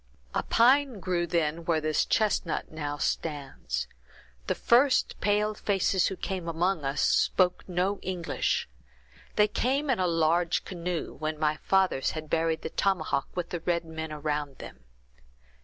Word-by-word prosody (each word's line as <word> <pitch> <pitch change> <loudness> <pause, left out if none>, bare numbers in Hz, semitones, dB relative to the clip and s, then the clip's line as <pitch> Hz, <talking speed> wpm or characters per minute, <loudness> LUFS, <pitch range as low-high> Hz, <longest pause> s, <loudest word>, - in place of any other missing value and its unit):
"A - - +1
pine 255 0 +3
grew 175 -2 -1
then 165 -1 0
where 165 -2 +2
this 155 0 +1
chestnut 210 -6 0
now 145 -2 -4
stands. 135 - -3 0.6
The - - +1
first 255 +2 +3
pale 210 +1 +2
faces 195 -2 +1
who 190 - -3
came 185 -2 -4
among 170 0 0
us 135 +1 -1
spoke 180 -1 +2
no 185 +3 0
English. 180 -2 -1 0.7
They 210 0 +5
came 270 +6 0
in 245 - 0
a 185 - +2
large 165 +1 +1
canoe, 175 -2 -4
when 155 0 -4
my 155 0 +1
fathers 190 -8 +1
had 155 -1 -7
buried 165 0 +1
the - - -4
tomahawk 170 -7 0
with 175 -2 -3
the 175 - -3
red 170 0 -1
men 160 -1 -6
around 150 -2 -3
them. 65 -1 -11
170 Hz, 150 wpm, -28 LUFS, 155-195 Hz, 0.7 s, They